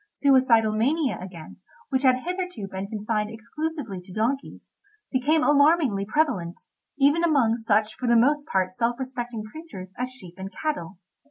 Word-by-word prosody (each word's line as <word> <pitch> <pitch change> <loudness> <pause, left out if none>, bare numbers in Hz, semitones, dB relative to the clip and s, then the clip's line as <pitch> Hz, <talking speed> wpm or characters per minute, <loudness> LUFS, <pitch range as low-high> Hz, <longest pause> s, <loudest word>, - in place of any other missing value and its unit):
Suicidal 255 -6 +4
mania, 270 +6 +1
again, 180 -4 -10 0.3
which 265 -2 +1
had 255 -2 +3
hitherto 360 - -4
been 190 +1 -5
confined 210 0 -2
exclusively 235 - -5
to 180 - -15
donkeys, 235 +8 -3 0.4
became 295 +5 +2
alarmingly 285 -8 +4
prevalent 220 - 0 0.4
even 290 +4 +4
among 275 -9 +3
such 220 -2 +1
for 250 - -4
the 235 - +5
most 290 +5 +3
part 190 -1 0
self 240 0 -1
respecting 245 -4 -4
creatures 215 - -9
as 250 0 -1
sheep 230 -9 -12
and 190 +1 -6
cattle. 195 - -3
240 Hz, 150 wpm, -25 LUFS, 210-285 Hz, 0.4 s, the